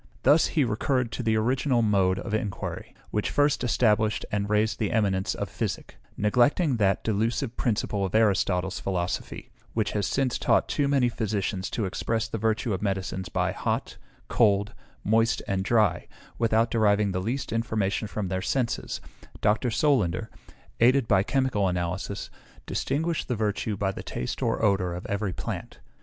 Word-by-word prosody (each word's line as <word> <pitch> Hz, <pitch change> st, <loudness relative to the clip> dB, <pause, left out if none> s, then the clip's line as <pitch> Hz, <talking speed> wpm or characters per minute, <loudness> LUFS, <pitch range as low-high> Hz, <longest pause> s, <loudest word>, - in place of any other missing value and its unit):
Thus 145 Hz, +5 st, +5 dB
he 150 Hz, -, +5 dB
recurred 125 Hz, +1 st, 0 dB
to -, -, -4 dB
the 110 Hz, -2 st, +1 dB
original 125 Hz, +2 st, +2 dB
mode 95 Hz, -3 st, +2 dB
of 100 Hz, -, -5 dB
inquiry, 110 Hz, -2 st, -4 dB, 0.2 s
which 105 Hz, -, 0 dB
first 145 Hz, -1 st, +2 dB
established 110 Hz, -3 st, +2 dB
and 100 Hz, -1 st, -1 dB
raised 105 Hz, +1 st, +1 dB
the 105 Hz, -3 st, 0 dB
eminence 100 Hz, -5 st, +1 dB
of -, -, -3 dB
physic; -, -, -4 dB, 0.2 s
neglecting 125 Hz, -, +3 dB
that 100 Hz, -3 st, +2 dB
delusive 115 Hz, +4 st, -1 dB
principle 105 Hz, -3 st, -1 dB
of 95 Hz, +2 st, -2 dB
Aristotle's 95 Hz, -4 st, +2 dB
philosophy, 90 Hz, -2 st, -3 dB, 0.2 s
which 110 Hz, -3 st, 0 dB
has 105 Hz, -1 st, -1 dB
since 135 Hz, -3 st, 0 dB
taught -, -, +2 dB
too 145 Hz, -2 st, 0 dB
many 135 Hz, -3 st, +3 dB
physicians 100 Hz, -4 st, -2 dB
to 110 Hz, -, -2 dB
express 115 Hz, +4 st, -1 dB
the 115 Hz, -, -4 dB
virtue 110 Hz, +1 st, 0 dB
of 95 Hz, -, -3 dB
medicines 95 Hz, -2 st, -2 dB
by -, -, 0 dB
hot, -, -, -3 dB, 0.3 s
cold, 105 Hz, -3 st, +2 dB, 0.3 s
moist, 115 Hz, +2 st, +2 dB
and 95 Hz, -1 st, 0 dB
dry, 110 Hz, +1 st, +2 dB, 0.3 s
without 115 Hz, 0 st, +2 dB
deriving 105 Hz, -2 st, +3 dB
the 90 Hz, 0 st, -2 dB
least 125 Hz, +7 st, -3 dB
information 110 Hz, -2 st, -1 dB
from 105 Hz, -1 st, -3 dB
their 95 Hz, 0 st, -1 dB
senses 120 Hz, +4 st, -2 dB, 0.4 s
Dr. 110 Hz, +4 st, +2 dB
Solander, 110 Hz, -, +1 dB, 0.5 s
aided 125 Hz, +1 st, +4 dB
by 95 Hz, -3 st, +4 dB
chemical 125 Hz, -3 st, +1 dB
analysis, 90 Hz, +3 st, -3 dB, 0.3 s
distinguished 160 Hz, +4 st, -1 dB
the 125 Hz, -, -1 dB
virtue 105 Hz, -1 st, -1 dB
by 95 Hz, 0 st, 0 dB
the -, -, -7 dB
taste 60 Hz, -, -4 dB
or -, -, +1 dB
odour 90 Hz, -4 st, +1 dB
of 90 Hz, -, -7 dB
every 100 Hz, -1 st, -2 dB
plant. -, -, -6 dB
110 Hz, 160 wpm, -26 LUFS, 100-120 Hz, 0.5 s, Thus